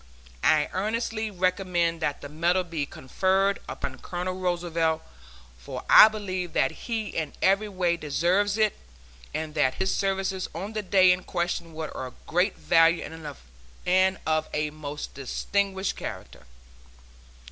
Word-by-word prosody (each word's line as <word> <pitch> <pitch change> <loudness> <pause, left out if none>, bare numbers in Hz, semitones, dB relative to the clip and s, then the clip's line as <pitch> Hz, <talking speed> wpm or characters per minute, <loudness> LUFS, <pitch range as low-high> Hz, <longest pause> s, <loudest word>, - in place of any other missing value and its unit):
I 150 -1 +4
earnestly 220 +2 -1
recommend 180 -3 0
that 145 -2 -1
the - - -6
medal 170 +5 +1
be 165 -5 -3
conferred 190 +10 0
upon - - -5
Colonel 180 +1 -4
Roosevelt, 170 -3 0 0.6
for - - -7
I - - +11
believe 185 -5 -4
that 135 - +2
he 225 -3 -4
in 155 -3 -3
every 195 +2 +2
way 180 -3 0
deserves 175 +7 +1
it, 215 -2 +1 0.5
and 155 0 -4
that 140 -4 +2
his 190 - 0
services 195 -1 -1
on 205 +3 -5
the 215 - -1
day 185 -1 +5
in 180 0 +1
question 170 -2 -3
were 160 -1 -4
of 130 -1 -7
great 180 +4 +1
value 165 0 +4 0.8
and 185 +1 +3
of 155 0 0
a 150 0 0
most 150 -1 -7
distinguished 190 +8 -1
character. - - -8
180 Hz, 135 wpm, -26 LUFS, 160-195 Hz, 0.8 s, I